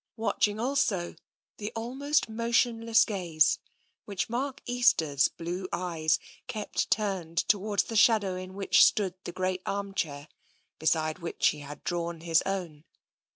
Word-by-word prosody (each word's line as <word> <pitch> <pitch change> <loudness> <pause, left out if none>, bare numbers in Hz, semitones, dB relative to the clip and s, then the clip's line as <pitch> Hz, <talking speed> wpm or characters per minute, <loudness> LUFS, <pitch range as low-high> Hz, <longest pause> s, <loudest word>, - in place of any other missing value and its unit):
Watch 225 -1 +2
ing 205 +1 -5
also 225 -8 0 0.4
the 210 0 -5
almost 270 +6 0
motionless 230 0 +2
gaze 170 -7 +2 0.5
which 200 0 -3
Mark 270 +3 -2
Easter's 165 - +3
blue 175 +3 -5
eyes 165 -3 0 0.3
kept 215 -5 -2
turned 190 -6 -1
towards 205 -1 +2
the 225 - -7
shadow 210 -4 +4
in 185 +1 -7
which 195 -2 +5
stood 195 -4 +3
the - - -4
great 185 0 -2
armchair, 195 -8 -3 0.5
beside 155 +1 +1
which 170 -1 +1
he 150 - -5
had 145 0 -10
drawn 170 -1 -3
his 165 -1 +3
own. 175 -6 -4
190 Hz, 135 wpm, -28 LUFS, 170-225 Hz, 0.5 s, which